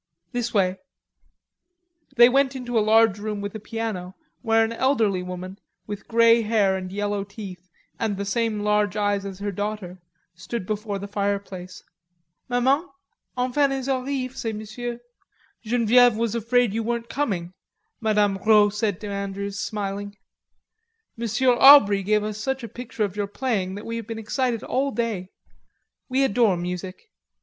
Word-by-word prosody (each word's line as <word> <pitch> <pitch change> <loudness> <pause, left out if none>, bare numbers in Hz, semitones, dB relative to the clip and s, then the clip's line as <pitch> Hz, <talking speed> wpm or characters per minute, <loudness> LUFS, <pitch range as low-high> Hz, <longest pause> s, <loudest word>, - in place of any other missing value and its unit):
This 240 -1 -2
way." 190 -3 +1 1.4
They 240 -1 +8
went 270 +1 +2
into 245 -2 -5
a 225 - +4
large 220 -1 +4
room 210 0 -4
with 200 0 -5
a 220 - -6
piano 210 -4 -5 0.3
where 225 -1 +3
an 225 - -4
elderly 230 -7 +1
woman, 180 +2 -7 0.3
with 205 -1 -7
grey 230 0 +5
hair 210 -3 +2
and 185 -1 -5
yellow 205 0 -2
teeth 195 -3 -10 0.3
and 215 -3 -1
the 200 - -3
same 215 +1 -1
large 210 -1 +1
eyes 205 -1 0
as 195 -2 -6
her 205 +1 -3
daughter, 200 -2 -5 0.3
stood 185 +4 -5
before 210 0 -3
the 200 +1 -6
fireplace. 200 -3 -4 0.7
"Maman... 265 +8 +2 0.5
enfin 255 +3 +2
ils 270 -1 -3
arrivent, 265 -1 -2
ces 225 -1 -3
messieurs." 235 +3 -6 0.6
"Genevieve 240 +1 +4
was 230 -1 0
afraid 235 -1 +2
you 225 - -1
weren't 235 +1 -2
coming," 195 -11 -2 0.5
Mme. 210 -3 +2
Rod 210 -2 +5
said 210 -3 -1
to 210 - -5
Andrews, 200 0 -4
smiling. 205 -1 -4 1.0
"Monsieur 235 +3 +2
Aubrey 240 -7 +8
gave 210 +2 +1
us 215 0 -4
such 265 +3 -2
a - - -4
picture 245 -1 -5
of 200 -2 -2
your 205 -1 -2
playing 200 -5 -2
that 205 - -8
we 230 0 -4
have 230 -2 -6
been 225 -1 -5
excited 230 +1 -1
all 275 +2 0
day.... 225 -8 -3 0.8
We 265 +1 +2
adore 225 -6 +3
music." 180 - -6
215 Hz, 155 wpm, -24 LUFS, 200-235 Hz, 1.4 s, They